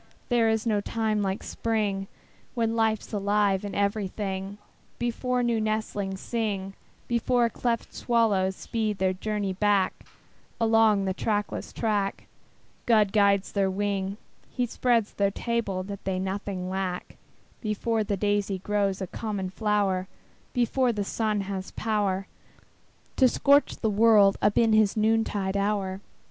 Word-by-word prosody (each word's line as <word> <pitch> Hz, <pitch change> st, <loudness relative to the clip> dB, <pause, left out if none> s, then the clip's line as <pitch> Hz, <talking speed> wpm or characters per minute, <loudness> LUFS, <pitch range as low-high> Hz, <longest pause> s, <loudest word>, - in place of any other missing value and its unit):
There 235 Hz, -2 st, +3 dB
is 220 Hz, 0 st, 0 dB
no 210 Hz, -3 st, +1 dB
time 215 Hz, 0 st, -1 dB
like 195 Hz, 0 st, -2 dB
Spring, 205 Hz, -4 st, -1 dB, 0.5 s
When 230 Hz, -1 st, 0 dB
life's 220 Hz, -2 st, 0 dB
alive 200 Hz, -1 st, +1 dB
in 200 Hz, -1 st, -5 dB
everything, 200 Hz, -1 st, -2 dB, 0.4 s
Before 245 Hz, +1 st, -1 dB
new 235 Hz, -2 st, +1 dB
nestlings 210 Hz, -3 st, -2 dB
sing, 200 Hz, -5 st, -2 dB, 0.3 s
Before 240 Hz, 0 st, +2 dB
cleft 235 Hz, 0 st, -2 dB
swallows 205 Hz, -6 st, +1 dB
speed 215 Hz, -1 st, -2 dB
their 185 Hz, -1 st, +1 dB
journey 205 Hz, 0 st, -2 dB
back 200 Hz, -1 st, +2 dB, 0.7 s
Along 225 Hz, -3 st, +4 dB
the 190 Hz, -, 0 dB
trackless 210 Hz, +1 st, -2 dB
track, 205 Hz, -3 st, -1 dB, 0.6 s
God 215 Hz, -4 st, +4 dB
guides 200 Hz, -2 st, +3 dB
their 195 Hz, -2 st, +1 dB
wing, 195 Hz, 0 st, -2 dB, 0.3 s
He 250 Hz, -, -1 dB
spreads 235 Hz, -2 st, +1 dB
their 200 Hz, -1 st, +2 dB
table 200 Hz, -3 st, -2 dB
that 200 Hz, +1 st, -7 dB
they 190 Hz, -1 st, -1 dB
nothing 190 Hz, 0 st, -3 dB
lack, 185 Hz, -1 st, -4 dB, 0.4 s
Before 220 Hz, +1 st, 0 dB
the 200 Hz, -1 st, -2 dB
daisy 205 Hz, -1 st, 0 dB
grows 200 Hz, 0 st, -1 dB
a -, -, -1 dB
common 200 Hz, -2 st, -4 dB
flower, 200 Hz, -3 st, 0 dB, 0.4 s
Before 245 Hz, +1 st, +2 dB
the 210 Hz, -3 st, -2 dB
sun 215 Hz, 0 st, -1 dB
has 190 Hz, -1 st, -5 dB
power 205 Hz, -3 st, 0 dB, 0.9 s
To 260 Hz, -, +6 dB
scorch 280 Hz, +3 st, +3 dB
the 220 Hz, -, -1 dB
world 210 Hz, -2 st, +5 dB
up 205 Hz, -, +2 dB
in 225 Hz, -2 st, +4 dB
his 215 Hz, -1 st, +3 dB
noontide 215 Hz, -3 st, +1 dB
hour. 200 Hz, -1 st, -1 dB
205 Hz, 135 wpm, -27 LUFS, 195-225 Hz, 0.9 s, To